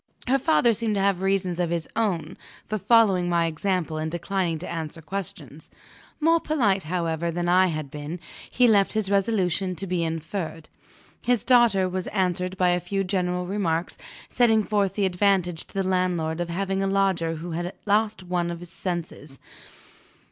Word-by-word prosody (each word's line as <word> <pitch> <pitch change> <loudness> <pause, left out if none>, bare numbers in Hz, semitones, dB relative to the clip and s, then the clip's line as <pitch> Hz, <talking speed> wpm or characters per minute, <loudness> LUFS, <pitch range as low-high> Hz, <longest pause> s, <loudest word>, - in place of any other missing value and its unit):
Her 270 +2 +3
father 250 -5 +3
seemed 220 0 -1
to 195 - +1
have 195 -2 +1
reasons 190 -2 0
of 175 -2 +1
his 170 -2 -2
own 190 -9 -1 0.3
for 215 0 -3
following 195 -5 +4
my 170 -1 +2
example 165 -1 -1
and 155 0 -2
declining 175 0 -1
to 175 - -7
answer 165 -1 -5
questions. 160 -4 -7 0.5
More 330 +2 +4
polite, 230 -13 +1
however, 170 -1 -1
than 175 +1 -2
I 185 +1 +5
had 155 -5 -4
been, 150 +4 -6 0.3
he 250 -1 +4
left 200 -3 +4
his 215 -3 0
resolution 190 -3 +1
to 195 - -4
be 180 -2 -1
inferred. 165 0 -4 0.5
His 245 -3 +1
daughter 235 -7 +4
was 185 0 -3
answered 185 -1 -1
by 180 -1 +3
a 175 0 +2
few 195 +3 -2
general 180 -1 -1
remarks, 180 -3 -1 0.3
setting 225 -3 +3
forth 200 -2 0
the 205 - +1
advantage 180 -2 +1
to - - -16
the 195 -1 0
landlord 175 -3 0
of 175 - -3
having 195 +2 -1
a 195 - +1
lodger 190 -4 +1
who 170 +2 -6
had 175 +2 -3
lost 210 -1 +1
one 175 -1 -1
of 170 0 -6
senses. 170 -5 -5
180 Hz, 170 wpm, -25 LUFS, 170-200 Hz, 0.5 s, I